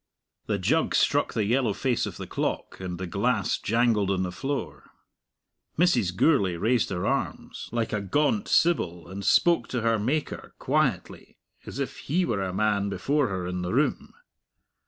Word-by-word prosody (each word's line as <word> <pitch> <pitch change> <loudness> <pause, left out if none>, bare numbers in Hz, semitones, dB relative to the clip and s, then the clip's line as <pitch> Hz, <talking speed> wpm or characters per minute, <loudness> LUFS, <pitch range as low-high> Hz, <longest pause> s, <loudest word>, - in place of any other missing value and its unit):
The - - 0
jug - - +1
struck - - +2
the 110 - +1
yellow 120 0 +1
face 125 +2 0
of - - -7
the - - -6
clock, - - -3
and 90 -2 -5
the 95 - -4
glass 105 +8 0
jangled 115 -3 +2
on 95 -1 +1
the 90 - -3
floor. 90 - -5 0.9
Mrs. 120 - +2
Gourlay 100 - +3
raised 115 +6 +1
her 90 -2 -3
arms, - - -3
like 115 -1 -2
a 105 - 0
gaunt 150 - +1
sibyl, 90 - +1
and 95 +3 -7
spoke 170 - +3
to 125 - -2
her 115 -1 +2
Maker, 140 +8 -3
quietly, - - -1 0.3
as - - -7
if - - -3
He 175 +6 0
were 105 -8 -1
a 95 -1 -2
man 100 0 +1
before 140 +7 0
her 95 -3 -3
in 90 0 -3
the 90 +1 -3
room. 145 +3 0
105 Hz, 170 wpm, -26 LUFS, 95-130 Hz, 0.9 s, Gourlay